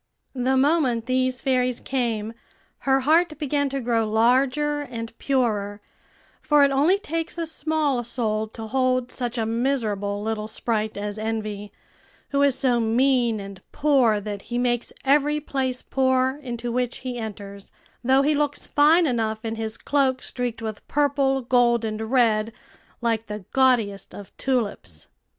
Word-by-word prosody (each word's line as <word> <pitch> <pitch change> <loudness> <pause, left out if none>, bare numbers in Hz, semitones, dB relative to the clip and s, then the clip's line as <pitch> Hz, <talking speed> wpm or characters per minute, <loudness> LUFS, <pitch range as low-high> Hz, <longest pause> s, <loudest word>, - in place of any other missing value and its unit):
The 260 0 +1
moment 265 -5 +2
these 255 0 0
fairies 250 -2 +1
came, 230 -4 -2 0.6
her 270 0 +4
heart 315 +3 +3
began 285 -1 0
to 275 0 -3
grow 230 -3 0
larger 265 +6 +2
and 230 -4 -7
purer; 215 -7 0 0.6
for 295 -1 +4
it 280 - +4
only 300 +8 +3
takes 330 -3 -4
a 335 - -1
small 310 -5 -1
soul 220 -2 -1
to 225 +1 -8
hold 255 +1 0
such 245 -1 -4
a 225 - 0
miserable 220 -4 -1
little 215 -1 -2
sprite 220 -1 -2
as 205 +1 -4
Envy, 215 -2 -4 0.6
who 280 0 +1
is 280 -2 +4
so 245 -3 +2
mean 235 0 +2
and 195 -1 -9
poor 260 -8 +3
that 205 -1 -6
he 240 - -2
makes 245 -1 0
every 295 +2 +3
place 265 -3 -3
poor 260 +1 +1
into 240 -2 -4
which 250 0 -2
he 250 -1 -3
enters, 200 -2 -8 0.3
though 265 +2 +4
he 300 +2 +3
looks 290 0 -1
fine 310 +4 +4
enough 225 -4 -1
in 225 - -2
his 225 0 -4
cloak 270 -2 0
streaked 245 -3 -4
with 215 -2 -6
purple, 275 -2 +1
gold, 240 -1 +3
and 215 0 -3
red, 225 -4 +2 0.5
like 230 -1 0
the 210 -2 -6
gaudiest 240 -7 +2
of 200 - -11
tulips. 205 - -2
245 Hz, 150 wpm, -24 LUFS, 220-270 Hz, 0.6 s, her